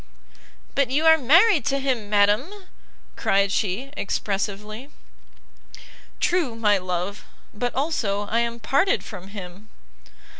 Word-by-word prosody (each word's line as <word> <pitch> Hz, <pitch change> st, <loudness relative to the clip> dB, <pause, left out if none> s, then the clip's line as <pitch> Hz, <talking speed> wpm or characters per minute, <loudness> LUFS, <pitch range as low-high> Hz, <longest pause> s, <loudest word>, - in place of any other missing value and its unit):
"But 275 Hz, -3 st, +1 dB
you 295 Hz, +5 st, +1 dB
are 320 Hz, 0 st, +8 dB
married 330 Hz, -, +5 dB
to 275 Hz, -, +1 dB
him, 255 Hz, -6 st, -2 dB
madam!" 210 Hz, -, +3 dB, 0.6 s
cried 195 Hz, 0 st, +1 dB
she, 215 Hz, +7 st, -2 dB
expressively. 210 Hz, +4 st, -3 dB, 1.3 s
"True, 335 Hz, -10 st, 0 dB
my 210 Hz, -3 st, +2 dB
love; 180 Hz, +2 st, -4 dB, 0.3 s
but, 245 Hz, +3 st, -3 dB
also, 250 Hz, -9 st, -1 dB
I 215 Hz, +3 st, -1 dB
am 235 Hz, 0 st, -2 dB
parted 280 Hz, -, +1 dB
from 190 Hz, -4 st, -9 dB
him!" 200 Hz, +1 st, -10 dB
220 Hz, 115 wpm, -23 LUFS, 200-275 Hz, 1.3 s, are